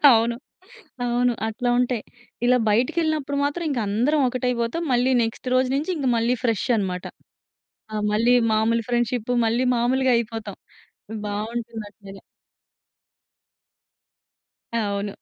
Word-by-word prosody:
అవును, 230 +1 +2 0.7
అవును. 245 +1 +2 0.2
అట్లా 245 +3 -2
ఉంటాయి. 250 -3 0 0.4
ఇలా 250 +1 +5
బయటికెళ్ళినప్పుడు 285 +5 0
మాత్రం 310 +4 -2
ఇంక 260 -4 -1
అందరం 250 +9 +2
ఒకటైపోతాం. 250 +3 -1
మళ్ళీ 250 +1 +3
నెక్స్ట్ 225 +3 -4
రోజు 255 0 +3
నుంచి 310 +6 -1 0.2
మళ్ళీ 230 +2 +2
ఫ్రెష్ 230 -5 +1
అన్నమాట. 185 -3 -2 0.9
ఆహ్, 210 -1 -2
మళ్ళీ 230 +4 +3 0.2
మాములు 225 +2 +2
ఫ్రెండ్షిప్ 240 -1 0 0.2
మళ్ళీ 235 +3 +1
మామూలుగైయిపోతాం 235 -4 0 0.7
బావుంటుందండి. 210 -2 -6 2.5
అవును. 205 -2 -1
235 Hz, 100 wpm, -23 LUFS, 220-250 Hz, 2.5 s, ఇలా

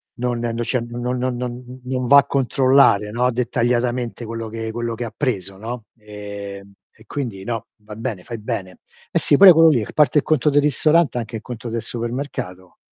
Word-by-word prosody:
non 120 -1 -2
non 115 -1 -2
c'è 125 +2 0
n 120 - -7
non 125 +1 -2
non 125 0 -1
non 125 +1 -7
non 125 -1 -2
va 140 +2 +8
a 140 - +6
controllare, 130 -6 +3
no, 125 +2 +1
dettagliatamente 120 0 -1
quello 115 0 -5
che 115 0 -5
quello 120 0 -3
che 120 - -5
ha 110 -2 -6
preso, 100 -9 -2
no. 115 +2 -6
Ehm, 100 -1 -9 0.2
e 110 - -21
quindi 115 -8 -5
no, 115 0 -4 0.2
va 105 0 -10
bene, 110 -5 -5
fai 115 +2 -7
bene. 95 -4 -5 0.3
Eh - - +2
sì 145 - +3
pure 190 +2 +10
quello 165 0 +6
lì, 120 -8 +2
r - - -9
parte 150 0 +3
il - - -3
conto 155 -1 +2
del 145 0 +3
ristorante 150 -1 +2
anche 115 0 -6
il - - -10
conto 120 -1 -7
del 115 0 -3
supermercato, 115 -7 -5
120 Hz, 205 wpm, -21 LUFS, 110-130 Hz, 0.3 s, pure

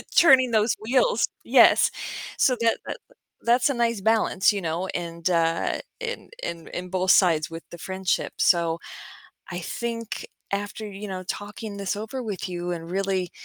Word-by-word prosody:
turning 260 -7 +7
those 220 +1 +3
wheels 270 - +2 0.2
yes, - - +6 0.5
so 255 - +4
that 230 0 +3
that - - -5 0.4
that's 240 +3 +3
a - - +1
nice 235 -3 0
balance, 220 -2 +3
you 200 - -2
know, 170 +2 -2
and, 170 0 -2
uh, 165 -1 +1 0.2
in - - -5
in 170 -1 -5
in 180 +1 -6
both 185 0 +2
sides 165 -5 +4
with 165 0 -7
the 170 - -9
friendship, 190 +1 -2
so 170 -2 +3 0.7
I 175 - -4
think 230 +5 -4 0.3
after, 205 +2 -3
you 205 +1 -7
know, 185 -1 -5
talking 205 +2 -6
this 200 0 -2
over 220 +5 -5
with 205 -5 -4
you 175 0 -4
and 165 -1 -5
really 190 -2 -1
195 Hz, 160 wpm, -25 LUFS, 175-225 Hz, 0.7 s, turning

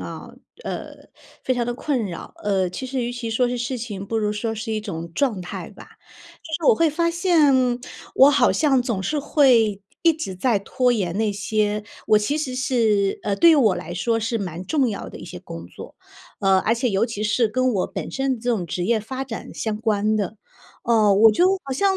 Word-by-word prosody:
啊， - - -8 0.3
呃， - - -7 0.3
非 260 - 0
常 240 -2 -1
地 240 - -2
困 255 -3 -1
扰， 170 -3 -8
呃， 190 -3 +1
其 260 +8 -6
实 260 -1 -2
与 240 - -2
其 245 -1 -5
说 240 +2 +1
是 245 0 -3
事 245 +2 -2
情， 210 -5 -6
不 225 - -2
如 210 -1 0
说 225 +2 -3
是 220 +1 -5
一 215 - -1
种 170 -5 -6
状 230 -8 0
态 175 - -7
吧。 - - -15 0.5
就 315 - -5
是 - - +4
我 - - +3
会 330 -1 +3
发 335 +3 0
现， 335 -5 +3 0.6
我 270 +2 +7
好 275 -4 +3
像 275 -4 +2
总 230 -6 -2
是 300 +9 -1
会 240 -9 +3 0.2
一 335 - +5
直 300 - -6
在 210 0 +1
拖 250 +4 +1
延 190 -6 -2
那 220 -2 +1
些 210 +1 -1 0.2
我 215 - +5
其 280 +9 -1
实 265 -4 -3
是 225 -6 +1
呃， 200 - 0
对 335 +11 +6
于 315 - +6
我 225 -9 +4
来 - - -6
说 225 +6 0
是 230 +1 -1
蛮 180 -3 -5
重 270 - +1
要 205 - -5
的 - - -10
一 - - -9
些 - - -9
工 85 +1 -9
作。 - - -12 0.4
呃， 195 -1 +3
而 220 - +1
且 240 +2 0
尤 195 +2 +2
其 225 -3 -4
是， 220 +2 +2
跟 255 +3 +1
我 190 - 0
本 - - -5
身 270 -2 -1
这 240 +2 -5
种 220 -7 +1
职 175 +1 -3
业 225 +2 +1
发 260 +5 -5
展 230 -4 -7
相 220 -2 -3
关 215 -1 0
的， 210 0 -2 0.5
哦， 220 -3 +4
我 215 +3 +6
就 280 - +3 0.2
好 275 - -4
像 385 +7 +2
225 Hz, 240 characters per minute, -22 LUFS, 205-260 Hz, 0.6 s, 我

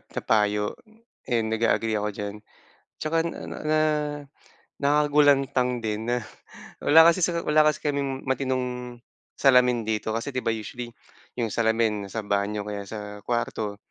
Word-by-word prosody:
na - - -7
payo, 105 -1 +2 0.6
and 115 -3 +1
nag-a-agree 110 -1 +1
ako 105 0 -1
diyan. 100 0 -5 0.7
Tsaka 165 +1 +1
na 170 - -5
na - - -7
na 155 0 +2 1.0
nakakagulantang 140 -4 +3
din 110 0 -3
na 120 0 0 0.6
wala 160 +2 +7
kasi 185 - -4
sa 170 0 +1
wala 155 0 +3
kasi 155 - -1
kaming 140 -2 -2
matinong 125 -2 -2 0.4
salamin 125 -3 +4
dito 110 0 -2
kasi 125 +5 -4
'di 130 - -1
ba, 115 - -3
usually 115 +2 -4 0.5
yung 115 -4 -2
salamin 110 -3 +1
nasa 110 +1 -5
banyo 100 +1 -1
o - - -8
kaya 100 -1 -5
sa 105 -1 -7
kuwarto. 115 -3 -2
120 Hz, 145 wpm, -25 LUFS, 105-135 Hz, 1.0 s, wala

